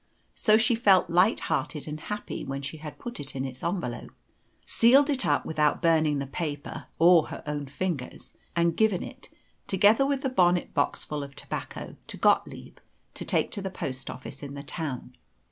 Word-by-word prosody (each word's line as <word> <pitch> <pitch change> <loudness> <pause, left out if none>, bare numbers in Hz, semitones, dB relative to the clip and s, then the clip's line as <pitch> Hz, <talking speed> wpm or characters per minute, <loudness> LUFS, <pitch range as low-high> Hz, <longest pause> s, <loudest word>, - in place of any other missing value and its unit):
So 215 -1 +4
she 230 +2 +3
felt 195 -6 +4
light 180 +6 +4
hearted 150 -1 -2
and 155 0 -5
happy 210 +6 -5
when 135 +1 -5
she 140 +3 -5
had 150 -1 -9
put 240 0 -6
it 140 -2 -5
in 135 0 -2
its 130 -1 -7
envelope, 170 -8 -3 0.6
sealed 275 +6 +5
it 270 -2 +1
up - - +2
without 150 -2 +1
burning 160 -3 +3
the 140 - -2
paper 145 0 -5
or 170 -1 +6
her - - -8
own 145 -1 -3
fingers, 140 -2 -4 0.2
and 170 -1 +2
given 215 -5 +2
it, - - -11 0.4
together 205 +6 +5
with 275 -1 0
the 265 - +1
bonnet 180 -7 +2
boxful 145 0 -1
of 140 0 -10
tobacco, - - -6
to - - -6
Gottlieb - - +1 0.4
to - - -5
take - - 0
to 205 - -3
the 190 - -3
post 135 -7 -5
office 130 - -8
in 140 -1 -7
the 140 - -7
town. 140 -5 -5
165 Hz, 180 wpm, -27 LUFS, 140-200 Hz, 0.6 s, or